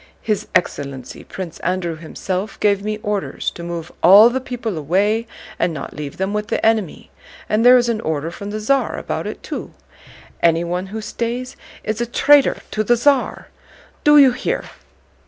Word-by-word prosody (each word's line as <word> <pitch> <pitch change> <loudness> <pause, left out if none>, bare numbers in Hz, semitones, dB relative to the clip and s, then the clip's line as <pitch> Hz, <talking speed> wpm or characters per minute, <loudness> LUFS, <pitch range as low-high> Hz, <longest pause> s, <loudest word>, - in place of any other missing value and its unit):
His 215 -2 -1
excellency 135 -6 -2
Prince 175 -3 -8
Andrew 180 -2 -2
himself 185 +5 -5
gave 200 -1 +2
me 215 0 -2
orders 205 -1 -2
to - - -10
move 170 -1 -6
all 205 +7 +8
the 260 +1 -2
people 240 -5 -4
away 200 +9 0 0.3
and 170 - 0
not 140 - -7
leave 145 -2 -7
them 190 +2 -2
with 210 0 -2
the - - -1
enemy, 220 -6 0 0.4
and 215 +2 +1
there 250 +1 +8
is 240 -1 +2
an 225 -2 -1
order 160 -1 -2
from 200 +3 -7
the 215 +1 -4
Tsar 270 +6 +1
about - - -4
it - - -7
too. - - -6 0.7
Anyone 170 +2 +1
who 220 +3 -6
stays 240 +4 -4 0.3
is 215 +2 -2
a 240 - -1
traitor 280 +3 +4
to 215 - 0
the 240 +3 +3
Tsar. 275 +2 +1 0.5
Do 295 0 +6
you 275 -3 +8
hear?" 250 - -2
210 Hz, 175 wpm, -20 LUFS, 175-235 Hz, 0.7 s, all